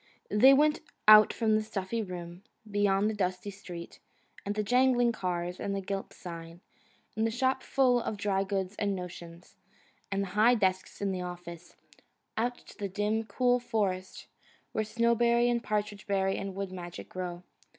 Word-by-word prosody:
They 230 Hz, +6 st, +7 dB
went 300 Hz, +2 st, +4 dB, 0.3 s
out 215 Hz, 0 st, +9 dB
from 220 Hz, -2 st, +1 dB
the 215 Hz, -, +3 dB
stuffy 215 Hz, +1 st, -3 dB
room, 175 Hz, -2 st, -7 dB, 0.3 s
beyond 205 Hz, 0 st, +2 dB
the 220 Hz, -, 0 dB
dusty 185 Hz, 0 st, -2 dB
street, 175 Hz, -3 st, -9 dB, 0.4 s
and 205 Hz, +1 st, -3 dB
the 210 Hz, -, 0 dB
jangling 245 Hz, +1 st, +3 dB
cars, 180 Hz, -4 st, -3 dB
and 200 Hz, -, -2 dB
the -, -, -1 dB
gilt 195 Hz, 0 st, -4 dB
sign, 170 Hz, -1 st, -9 dB, 0.5 s
and 220 Hz, +1 st, +1 dB
the -, -, 0 dB
shop 260 Hz, +3 st, 0 dB
full 250 Hz, -3 st, +2 dB
of 215 Hz, -, -3 dB
dry 200 Hz, -1 st, 0 dB
goods 195 Hz, 0 st, -2 dB
and 200 Hz, -2 st, 0 dB
notions, 175 Hz, -1 st, -9 dB, 0.5 s
and 195 Hz, 0 st, 0 dB
the -, -, -4 dB
high 225 Hz, +4 st, +5 dB
desks 190 Hz, -3 st, -1 dB
in 200 Hz, -1 st, 0 dB
the 185 Hz, -1 st, -3 dB
office 175 Hz, -1 st, -8 dB, 0.6 s
out 240 Hz, +2 st, -1 dB
to -, -, -16 dB
the 200 Hz, -1 st, -3 dB
dim, 210 Hz, +3 st, -1 dB
cool 245 Hz, +3 st, +2 dB
forest, 200 Hz, -6 st, -2 dB, 0.5 s
where 220 Hz, -, 0 dB
Snowberry 235 Hz, +1 st, +2 dB
and 235 Hz, -1 st, -1 dB
Partridge 210 Hz, -1 st, -2 dB
berry 195 Hz, -1 st, +1 dB
and 195 Hz, -1 st, -5 dB
Wood 195 Hz, -1 st, -4 dB
Magic 175 Hz, -2 st, -8 dB
grow. 180 Hz, -1 st, -6 dB
200 Hz, 170 wpm, -30 LUFS, 185-225 Hz, 0.6 s, out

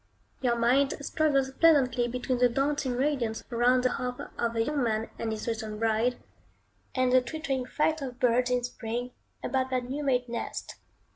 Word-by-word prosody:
Your 245 Hz, -2 st, +2 dB
mind 260 Hz, +5 st, +3 dB
struggles 280 Hz, -2 st, +1 dB
pleasantly 265 Hz, -5 st, +4 dB
between 250 Hz, +1 st, -2 dB
the 245 Hz, 0 st, +5 dB
dancing 275 Hz, +1 st, 0 dB
radiance 255 Hz, -4 st, 0 dB
round 245 Hz, +2 st, +3 dB
the 255 Hz, -, +2 dB
hearth 250 Hz, 0 st, -3 dB, 0.2 s
of 235 Hz, -1 st, -1 dB
a 225 Hz, -, +2 dB
young 295 Hz, +3 st, -1 dB
man 225 Hz, -2 st, -1 dB
and 225 Hz, -, -2 dB
his 220 Hz, +1 st, -5 dB
recent 220 Hz, -2 st, -3 dB
bride, 225 Hz, +2 st, +1 dB, 0.8 s
and 255 Hz, -1 st, +2 dB
the 255 Hz, -, +6 dB
twittering 270 Hz, -1 st, -3 dB
flight 310 Hz, +2 st, 0 dB
of 255 Hz, -2 st, -6 dB
birds 250 Hz, -1 st, +3 dB
in 250 Hz, -1 st, +1 dB
spring, 245 Hz, 0 st, -4 dB, 0.3 s
about 260 Hz, -1 st, 0 dB
their 255 Hz, -1 st, 0 dB
new 265 Hz, +4 st, -4 dB
made 250 Hz, -3 st, +1 dB
nest. 235 Hz, 0 st, -5 dB
250 Hz, 170 wpm, -28 LUFS, 235-270 Hz, 0.8 s, the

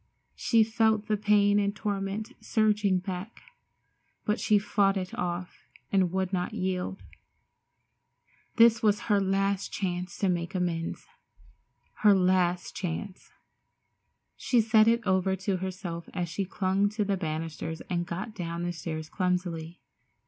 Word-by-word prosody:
She 225 Hz, -2 st, +3 dB
felt 220 Hz, -1 st, +2 dB
the 215 Hz, -, +1 dB
pain 205 Hz, 0 st, +3 dB
and 200 Hz, 0 st, 0 dB
torment 205 Hz, +2 st, -3 dB
surging 210 Hz, -4 st, +2 dB
back, 185 Hz, +3 st, -6 dB, 0.8 s
but 210 Hz, -, 0 dB
she 215 Hz, -, +3 dB
fought 200 Hz, -1 st, +2 dB
it 185 Hz, -1 st, -4 dB
off 180 Hz, 0 st, -4 dB, 0.2 s
and 185 Hz, -3 st, +3 dB
would 190 Hz, 0 st, -1 dB
not 180 Hz, -1 st, -1 dB
yield. 185 Hz, 0 st, -2 dB, 1.5 s
This 230 Hz, -2 st, +6 dB
was 210 Hz, -1 st, +3 dB
her 205 Hz, -, +5 dB
last 195 Hz, 0 st, 0 dB
chance 180 Hz, -2 st, -3 dB
to 200 Hz, -, +1 dB
make 175 Hz, +1 st, -1 dB
amends—her 185 Hz, -, -2 dB
last 180 Hz, -1 st, +1 dB
chance. 185 Hz, +2 st, -5 dB, 1.1 s
She 245 Hz, -, +1 dB
said 220 Hz, 0 st, +5 dB
it 235 Hz, 0 st, +3 dB
over 190 Hz, 0 st, +2 dB
to 190 Hz, 0 st, -1 dB
herself 180 Hz, -2 st, -5 dB
as 175 Hz, -2 st, -1 dB
she 190 Hz, +4 st, -2 dB
clung 190 Hz, +1 st, +1 dB
to 210 Hz, 0 st, -1 dB
the 200 Hz, 0 st, +1 dB
banisters 160 Hz, -1 st, -4 dB
and 175 Hz, -1 st, -2 dB
got 190 Hz, +6 st, -5 dB
down 170 Hz, -4 st, -4 dB
the 175 Hz, 0 st, -2 dB
stairs 160 Hz, -2 st, -5 dB
clumsily. 180 Hz, -2 st, -2 dB
190 Hz, 135 wpm, -28 LUFS, 180-210 Hz, 1.5 s, This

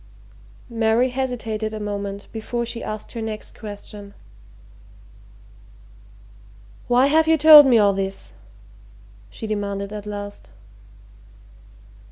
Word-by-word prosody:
Mary 230 Hz, +2 st, +2 dB
hesitated 225 Hz, -4 st, -3 dB
a -, -, -5 dB
moment 200 Hz, -1 st, -5 dB
before 235 Hz, +2 st, -4 dB
she 230 Hz, 0 st, -6 dB
asked 215 Hz, 0 st, -6 dB
her 230 Hz, -, -6 dB
next 220 Hz, -1 st, -7 dB
question. 205 Hz, -1 st, -10 dB, 2.7 s
"Why 245 Hz, +2 st, +4 dB
have 315 Hz, +3 st, +3 dB
you 320 Hz, 0 st, +4 dB
told 300 Hz, -1 st, +9 dB
me 245 Hz, -3 st, +5 dB
all 205 Hz, -2 st, +4 dB
this?" 195 Hz, 0 st, -5 dB, 1.0 s
she 225 Hz, -, -8 dB
demanded 200 Hz, -1 st, -4 dB
at 210 Hz, 0 st, -7 dB
last. 205 Hz, 0 st, -8 dB
215 Hz, 105 wpm, -22 LUFS, 205-245 Hz, 2.7 s, told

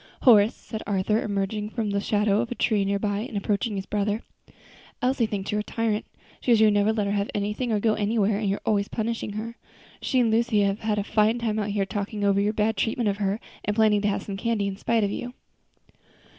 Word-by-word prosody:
"Horace," 220 Hz, -4 st, +6 dB
said 220 Hz, -2 st, -7 dB
Arthur, 205 Hz, +2 st, +1 dB
emerging 210 Hz, +1 st, -2 dB
from 220 Hz, -2 st, -2 dB
the 200 Hz, 0 st, 0 dB
shadow 210 Hz, 0 st, +2 dB
of 240 Hz, -, -5 dB
a -, -, -2 dB
tree 215 Hz, -4 st, +1 dB
near 200 Hz, +1 st, +1 dB
by 205 Hz, 0 st, -1 dB
and 215 Hz, -1 st, -4 dB
approaching 205 Hz, +2 st, -1 dB
his 195 Hz, -1 st, -4 dB
brother, 210 Hz, +2 st, -1 dB, 0.8 s
"Elsie 250 Hz, -2 st, +1 dB
thinks 200 Hz, -2 st, -3 dB
you're 210 Hz, -, 0 dB
a -, -, -6 dB
tyrant. 220 Hz, -1 st, -1 dB, 0.3 s
She -, -, -5 dB
says 230 Hz, -2 st, +6 dB
you 215 Hz, -1 st, +6 dB
never 205 Hz, +1 st, +3 dB
let 215 Hz, -2 st, 0 dB
her 200 Hz, -, -1 dB
have 200 Hz, 0 st, -1 dB
anything, 210 Hz, +4 st, -1 dB
or 215 Hz, -, +2 dB
go 220 Hz, +1 st, +2 dB
anywhere, 210 Hz, -1 st, +1 dB
and 210 Hz, -3 st, -1 dB
you're 200 Hz, -, -1 dB
always 205 Hz, -2 st, +1 dB
punishing 225 Hz, -2 st, -3 dB
her. 230 Hz, +3 st, -5 dB, 0.4 s
She 260 Hz, -, +1 dB
and 235 Hz, -3 st, +3 dB
Lucy 225 Hz, -1 st, +2 dB
have 200 Hz, +1 st, +1 dB
had 215 Hz, -1 st, -1 dB
a 205 Hz, -, 0 dB
fine 215 Hz, +2 st, +2 dB
time 220 Hz, -2 st, -1 dB
out 210 Hz, -1 st, -2 dB
here 200 Hz, -1 st, 0 dB
talking 205 Hz, 0 st, -4 dB
over 200 Hz, 0 st, +3 dB
your 205 Hz, +1 st, +2 dB
bad 220 Hz, +1 st, 0 dB
treatment 225 Hz, -1 st, 0 dB
of 200 Hz, -, -2 dB
her, 200 Hz, +1 st, -1 dB, 0.2 s
and 210 Hz, -, -1 dB
planning 215 Hz, -2 st, +4 dB
to 205 Hz, -, +1 dB
have 200 Hz, -, -1 dB
some 195 Hz, -1 st, -5 dB
candy 225 Hz, -1 st, 0 dB
in 200 Hz, -1 st, -2 dB
spite 225 Hz, +2 st, +1 dB
of 200 Hz, -, 0 dB
you." 245 Hz, +4 st, -5 dB
210 Hz, 235 wpm, -25 LUFS, 200-225 Hz, 0.8 s, Horace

